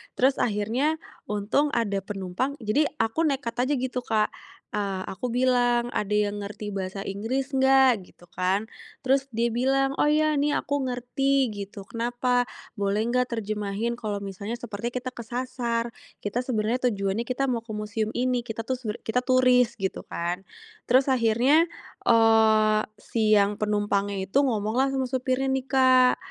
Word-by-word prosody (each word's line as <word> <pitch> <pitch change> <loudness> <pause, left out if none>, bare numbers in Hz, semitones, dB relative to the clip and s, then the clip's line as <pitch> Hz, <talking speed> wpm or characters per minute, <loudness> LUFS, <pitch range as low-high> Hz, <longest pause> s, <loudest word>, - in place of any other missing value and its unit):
Terus 265 +2 +2
akhirnya 235 +8 +1 0.3
untung 210 +8 +1
ada 205 -4 0
penumpang 195 +7 -3
jadi 255 +8 +2
aku 225 +8 0
nekat 270 -5 -2
aja 290 - +1
gitu 255 0 -2
Kak, 215 -3 +1 0.4
eee, 200 -2 -2
aku 195 +7 -4
bilang, 245 -1 +2
"Ada 210 0 -1 0.2
yang 205 0 -5
ngerti 205 0 -6
bahasa 195 0 -4
Inggris 255 +8 -3
gak?" 265 -4 +5
Gitu 175 - -19
kan. 190 +3 0 0.4
Terus 270 +1 +2
dibilang, 250 +4 +1
"Oh 295 - +4
ya 310 0 +3
nih 290 +1 +1
aku 285 -1 -1
ngerti," 255 0 0
gitu, 200 -1 -8
"kenapa?" 245 +2 0 0.2
"Boleh 205 0 0
nggak 250 +1 +1
terjemahin 210 +1 -2
kalau 215 -4 -4
misalnya 200 +3 -5
seperti 225 -1 -5
kita 250 +1 -5
kesasar. 235 -1 -3 0.3
Kita 210 +4 -2
sebenarnya 250 0 0
tujuannya 200 0 -1
kita 255 +2 0
mau 245 -3 -1
ke 230 -1 -10
museum 215 +1 -2
ini, 250 0 +1
kita 225 -1 -6
tuh 260 - -1
seber 215 -4 -4
kita 250 +3 +1
turis," 250 -2 +3
gitu 195 -2 -3
kan. 175 +2 -3 0.5
Terus 260 +2 +5
akhirnya, 255 +8 +3 0.4
eee, 220 -2 +5 0.2
si 215 -1 +2
yang 200 0 +3
penumpangnya 205 -2 0
itu 260 +9 +2
ngomong 220 -5 0
lah 270 - +2
sama 270 -1 -1
supirnya 255 +1 -1
nih 265 -1 -1
Kak. 255 -1 +5
235 Hz, 155 wpm, -26 LUFS, 210-255 Hz, 0.5 s, gak